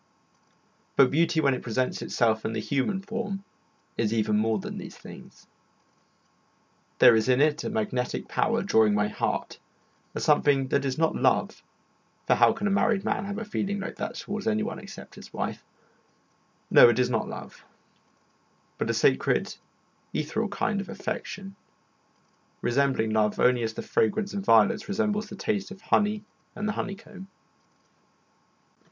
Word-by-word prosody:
But 135 -2 +5
beauty 165 +2 +2
when 140 -2 +3
it 125 - -4
presents 125 +2 -2
itself 110 -2 +1
in 110 - -2
the 110 - -2
human 145 - -1
form 205 -2 -4 0.5
is 110 -2 0
even 110 -2 +1
more 110 +1 +2
than 95 - -6
these - - -9
things. - - -13 1.5
There 115 - +8
is 110 +3 +1
in 130 0 +4
it 150 +2 +2
a - - -2
magnetic 210 - -2
power - - 0
drawing 110 -2 +3
my 105 0 +1
heart; - - -3 0.6
a - - -2
something 145 -3 +3
that 140 +1 +1
is 130 -1 -2
not 160 0 +1
love, - - +1 0.6
for - - +4
how - - +5
can 205 - -4
a 205 - +1
married 200 0 +2
man 195 - -1
have 200 +1 -4
a 225 - -4
feeling 200 -1 -2
like 190 - -6
that 225 - -4
towards 210 -1 -5
anyone 215 0 -1
except 200 - -11
his - - -13
wife? - - -4 1.1
No, - - +9
it 120 - +1
is 125 0 +2
not 110 -2 0
love, - - -9 1.2
but - - -1
a - - +1
sacred - - +2 0.6
ethereal 165 +9 -1
kind 200 0 -1
of 195 - -9
affection, 195 +2 -6 1.1
resembling 130 -3 +1
love 105 -1 +1
only 125 -1 +4
as 110 -1 -2
the - - -5
fragrance 200 - 0
of 200 -1 -3
violets 115 - +4
resembles 210 0 -1
the - - -8
taste 205 -2 -2
of 200 -2 -10
honey 210 -1 +1 0.3
and 210 0 -3
the 210 - 0
honey 195 -2 -3
comb. 195 -2 -13
160 Hz, 160 wpm, -27 LUFS, -, 1.5 s, No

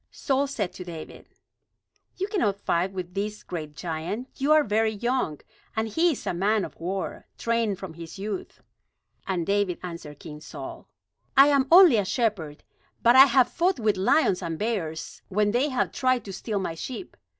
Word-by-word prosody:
Saul 275 0 0
said 210 -9 -3
to 180 - -8
David: 165 -3 -9 0.9
"You 385 - -1
cannot 215 - 0
fight 180 +1 0
with 180 -2 -6
this 210 +2 -3
great 155 -4 -6
giant. 170 - -4
You 280 +3 0
are 310 0 +6
very 220 0 +1
young; 235 - -1 0.4
and 220 0 0
he 325 +10 +2
is - - -8
a - - -1
man 200 +3 +1
of - - -11
war, 185 +3 -4
trained 230 -4 0
from 190 -4 -8
his 165 +3 -9
youth." 200 -1 -6 0.6
And 180 -4 -1
David 200 -2 +1
answered 165 -5 -7
King 150 -2 -10
Saul: - - -9 0.5
"I 275 +2 +9
am 275 -2 +3
only 345 - +9
a 205 - +2
shepherd, 185 - -1 0.4
but 235 +1 +6
I 265 +1 +11
have 255 -2 +4
fought 350 0 +1
with 215 -2 +2
lions 190 - +2
and 165 -2 -3
bears, 180 -8 -3
when 205 +1 +2
they 255 +6 +1
have 255 -2 0
tried 255 -2 +1
to 195 - -7
steal 210 +2 -3
my 190 -4 -2
sheep. 255 - -7
205 Hz, 180 wpm, -26 LUFS, 180-255 Hz, 0.9 s, I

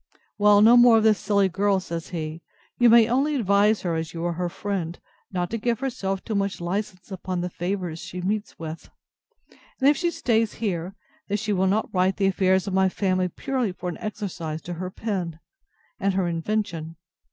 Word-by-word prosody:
Well, 205 0 +6
no 230 +2 +8
more 240 -1 +7
of 220 - +2
this 215 -3 +4
silly 200 -1 +2
girl, 195 +2 +1
says 170 -3 -5
he; 160 -1 -5 0.4
you 240 -1 +6
may 230 -1 +7
only 275 +5 +1
advise 210 -2 +3
her, 175 -2 -1
as 160 0 -3
you 165 +1 -3
are 175 - 0
her 175 +1 -2
friend, 175 -3 -4 0.3
not 180 -2 -2
to 230 - -2
give 235 +1 0
herself 205 -8 -3
too 225 - -4
much 200 -1 -1
licence 185 +2 -4
upon 185 -1 -3
the 180 0 -3
favours 175 -2 -3
she 180 - -7
meets 205 +4 -2
with; 160 0 -7 0.9
and 265 - +3
if 290 - +6
she 345 +4 0
stays 225 -8 +1
here, 190 -3 -3 0.3
that 205 - 0
she 210 0 -1
will 190 0 +2
not 210 +4 0
write 185 +1 +2
the 200 - +1
affairs 190 0 +2
of 195 - -4
my 190 0 +3
family 185 -1 0
purely 255 - -2
for 180 0 -5
an 170 - -7
exercise 180 -7 -4
to 175 - -5
her 180 +2 -4
pen, 185 -6 -4 0.6
and 195 -1 0
her 190 -2 +1
invention. 165 -2 -2
190 Hz, 195 wpm, -25 LUFS, 175-215 Hz, 0.9 s, no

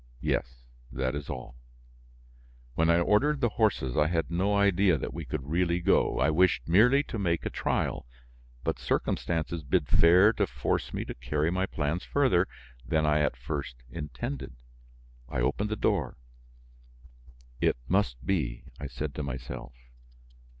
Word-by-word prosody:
"Yes, - - -2 0.3
that 65 0 -1
is 70 -1 -5
all." 60 -3 -7 1.2
When 80 +4 +2
I 85 - +5
ordered 140 - +2
the 120 - +2
horses 105 - 0
I 75 - +3
had 80 0 -1
no 95 +4 +1
idea 100 -3 +4
that - - -5
we 80 -3 -6
would 70 -1 -4
really 85 +2 +1
go, 90 - +2
I 70 +4 +3
wished 85 -6 +2
merely 125 - +5
to 115 - -5
make 85 -4 0
a - - -2
trial, - - -1 0.6
but - - -1
circumstances 85 0 -1
bid 70 - 0
fair 90 +6 +6
to - - 0
force - - -2
me - - -3
to - - -5
carry 75 +7 -1
my 95 +1 0
plans 75 +3 -2
farther 125 -11 +2 0.4
than 80 +6 +1
I 75 0 +3
at 75 -5 0
first 70 0 -4 0.2
intended. 65 -3 -5 0.7
I - - -2
opened 100 - 0
the 110 - -1
door. 95 -10 0 1.4
"It - - +2
must 90 -11 0
be!" 65 -11 -1 0.2
I 70 - -4
said 70 +3 -5
to 75 - -4
myself. 60 -2 -6
80 Hz, 155 wpm, -28 LUFS, 65-95 Hz, 1.4 s, fair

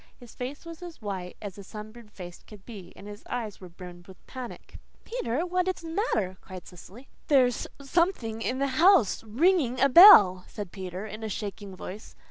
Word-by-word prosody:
His 245 -2 -14
face 265 +6 -7
was 335 0 -10
as 350 -2 -10
white 190 -4 -6
as 200 -1 -8
a - - -9
sunburned 215 +2 -11
face 175 -3 -10
could 205 -3 -16
be, 195 -7 -11
and 200 - -12
his 205 0 -10
eyes 225 -5 -5
were 185 - -10
brimmed 175 0 -12
with 190 -1 -16
panic. 255 -2 -10 0.2
"Peter, 335 - -3
what 365 +1 -1
is 370 -2 -3
the 330 - -7
matter?" 215 - -1
cried 185 -2 -11
Cecily. 195 +8 -14 0.2
"There's 255 -4 +2
SOMETHING 275 - -1
in 250 +3 -2
the 275 +2 -1
house, 355 - +4
RINGING 255 - +1
A 275 - +4
BELL," 215 - +9
said 205 -4 -8
Peter, 185 +1 -7
in 215 +1 -8
a 220 - -4
shaking 200 -1 -6
voice. 190 +3 -10
225 Hz, 190 wpm, -27 LUFS, 190-280 Hz, 0.2 s, BELL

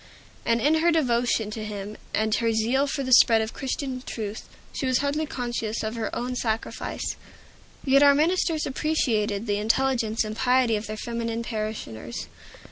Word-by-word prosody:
And 230 0 +3
in 300 +6 +3
her 340 +1 +4
devotion 240 -7 +1
to 215 0 -5
him, 210 0 -6 0.2
and 220 0 +1
her 230 0 +2
zeal 235 +6 +2
for 275 0 -2
the 255 -1 +1
spread 230 -2 +7
of 220 0 -2
Christian 265 -1 -3
truth, 215 -3 -6 0.2
she 270 - -2
was 255 -1 +3
hardly 290 +3 -1
conscious 235 -4 -3
of 220 0 -2
her 230 -2 -2
own 250 +1 -3
sacrifice. 225 -2 -3 0.7
Yet 275 0 +5
our 285 -1 +7
ministers 320 0 +1
appreciated 230 -8 0
the 205 -2 0
intelligence 230 0 +1
and 215 0 -5
piety 250 -1 +3
of 210 +1 -4
their 215 0 -5
feminine 230 0 -3
parishioners. 215 - -5
235 Hz, 165 wpm, -25 LUFS, 220-270 Hz, 0.7 s, spread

